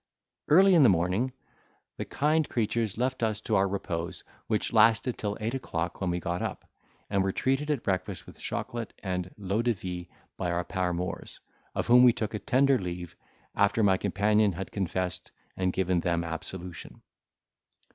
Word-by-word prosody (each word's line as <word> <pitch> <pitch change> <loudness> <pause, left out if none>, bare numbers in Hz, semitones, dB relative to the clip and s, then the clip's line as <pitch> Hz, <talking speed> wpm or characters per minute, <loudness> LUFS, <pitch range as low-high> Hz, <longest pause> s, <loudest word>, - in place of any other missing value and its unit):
Early 190 +5 +7
in 170 - +7
the 130 - +7
morning, 95 +8 +1 0.7
the - - -3
kind 155 +1 +1
creatures 110 -2 -1
left 125 +1 -1
us 110 -2 0
to 110 -1 0
our 95 +1 +4
repose, 90 -3 -4 0.2
which 110 0 -1
lasted 115 +2 +4
till 105 -1 -3
eight 110 +2 -2
o'clock 85 -11 -3
when 95 - 0
we 90 0 0
got 85 0 -3
up, - - -4 0.4
and 100 -1 +2
were 95 0 +1
treated 135 +8 0
at 145 -5 0
breakfast 95 0 -2
with - - -14
chocolate 115 -2 -4
and 90 -2 -3
l'eau 100 +2 -1
de 120 0 +2
vie 90 -3 -6 0.3
by 90 - -1
our 85 0 0
paramours, 90 -1 -3 0.4
of - - 0
whom 125 +1 +7
we 125 -2 +7
took 110 -1 -3
a 105 - -2
tender 130 +5 +3
leave, 90 -2 -5 0.4
after 100 +2 +2
my 95 -2 +5
companion 105 +1 +2
had 95 +3 -6
confessed 95 -2 -2 0.3
and 95 -1 0
given 90 -1 +1
them 85 0 0
absolution. 85 +2 -7
100 Hz, 170 wpm, -28 LUFS, 90-115 Hz, 0.7 s, Early